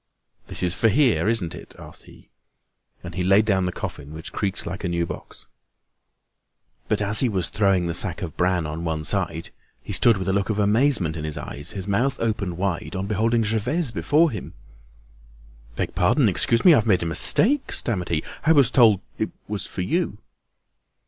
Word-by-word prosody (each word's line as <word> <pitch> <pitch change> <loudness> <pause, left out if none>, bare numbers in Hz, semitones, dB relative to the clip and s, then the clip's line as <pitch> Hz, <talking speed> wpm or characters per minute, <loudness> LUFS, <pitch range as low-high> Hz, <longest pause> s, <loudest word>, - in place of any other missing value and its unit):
"This - - 0
is 90 -1 +2
for 110 +5 +2
here, 125 -4 +2
isn't 105 -8 -1
it?" - - -11
asked - - -13
he. - - -18 0.7
And 90 -1 -8
he 90 - -3
laid 100 +4 +4
down 95 -4 +1
the - - -2
coffin, 75 -3 -7
which 80 - -8
creaked 100 -2 -2
like 95 +2 -6
a 90 - -1
new 85 0 -1
box. - - -9 1.4
But - - 0
as 105 +1 +4
he 130 - +3
was 95 -5 -1
throwing 95 -4 +1
the 85 - -2
sack 90 +2 0
of 80 -5 -6
bran 90 -2 +1
on 75 +2 -5
one 80 -2 -2
side, - - -2 0.3
he - - -6
stood 115 -3 +4
with 95 0 -4
a 95 - +1
look 100 +1 0
of 110 - -1
amazement 105 - +2
in 80 - -5
his 75 -1 -4
eyes, 70 +8 -6
his 95 -2 -5
mouth 125 +7 0
opened 105 -6 -2
wide, 90 -3 -3
on 95 +1 -3
beholding 115 +3 +1
Gervaise 120 +8 0
before 145 - +2
him. 105 - -8 1.2
"Beg - - -3
pardon, 100 +8 +3
excuse 115 +4 +1
me. 175 - +9
I've 115 -6 +2
made 95 -5 +3
a - - -3
mistake," 250 - +2
stammered 95 -7 -2
he. 80 -2 0 0.2
"I 160 - +4
was 140 -5 +4
told 110 -6 +5 0.2
it 110 - -1 0.2
was 105 -1 -4
for - - -5
you." 165 - -1
100 Hz, 195 wpm, -23 LUFS, 90-115 Hz, 1.4 s, me